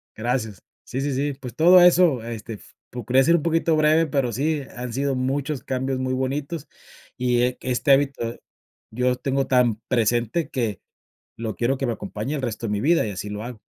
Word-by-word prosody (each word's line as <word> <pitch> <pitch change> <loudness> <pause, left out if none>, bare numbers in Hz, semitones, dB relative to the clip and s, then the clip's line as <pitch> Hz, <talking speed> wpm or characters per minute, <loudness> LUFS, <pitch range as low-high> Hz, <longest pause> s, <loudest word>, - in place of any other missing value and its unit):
gracias. 110 -3 -2 0.2
Sí, 130 - -4
sí, 140 0 -1
sí. 140 +2 -1
Pues, 130 -3 -9
todo 175 +3 +7
eso, 175 -8 +5
este, 115 -1 -6
f 105 - -11 0.2
procurare 125 +2 +1
ser 170 - +5
un - - -3
poquito 165 -1 +2
breve, 155 +1 +4
pero 135 -5 0
sí, 145 +5 -1
han 125 -1 -5
sido 135 +2 0
muchos 135 +2 -2
cambios 130 0 -2
muy 130 0 -1
bonitos. 140 +4 -3 0.5
Y 125 0 +1
que 130 - -5
este 125 +3 +1
hábito 135 -4 +1 0.5
yo 125 +3 +1
lo 125 - +1
tengo 135 +1 -1
tan 125 -4 +3
presente 120 +5 0
que 115 -7 -2 0.6
lo 110 -3 -4
quiero 125 +6 0
que 135 -2 -2
me 120 - 0
acompañe 110 +6 -5
el 140 - -3
resto 115 -1 -3
de - - -3
mi 105 - -1
vida 165 0 +3
y 105 - -3
así 100 +2 -6
lo 105 +1 -5
hago. 120 -2 -8
130 Hz, 200 wpm, -23 LUFS, 120-140 Hz, 0.6 s, todo